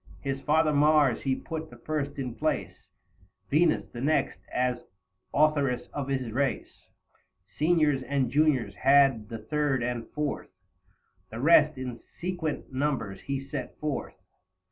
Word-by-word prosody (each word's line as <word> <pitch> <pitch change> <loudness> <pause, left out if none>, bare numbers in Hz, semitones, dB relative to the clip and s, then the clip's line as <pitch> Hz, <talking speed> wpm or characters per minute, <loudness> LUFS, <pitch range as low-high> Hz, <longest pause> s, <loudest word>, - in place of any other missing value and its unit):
40 140 - -3
His 135 0 -4
father 155 0 +3
Mars 145 -3 +4
he 135 -1 0
put 160 +1 -6
the - - -13
first 145 -2 -3
in 130 -4 -3
place; - - -3 0.6
Venus 160 +3 +3
the 120 - -7
next 155 +4 +1
as 125 -1 0 0.5
authoress 145 -4 +2
of 140 -2 -3
his 130 -4 -2
race; 135 +2 -2 0.7
Seniors 155 -4 +3
and 130 -2 -1
Juniors 140 -8 +2
had 135 -3 +4
the 115 - -5
third 135 +2 -1
and 120 -1 -3
fourth; 150 -1 -3 0.8
The 110 - -7
rest 150 +1 +5
in 125 -2 -5 0.2
sequent 170 -6 -3
numbers 130 -8 -2
he 135 -1 -4
set 135 -2 -6
forth. 150 -2 -3
140 Hz, 140 wpm, -28 LUFS, 125-150 Hz, 0.8 s, rest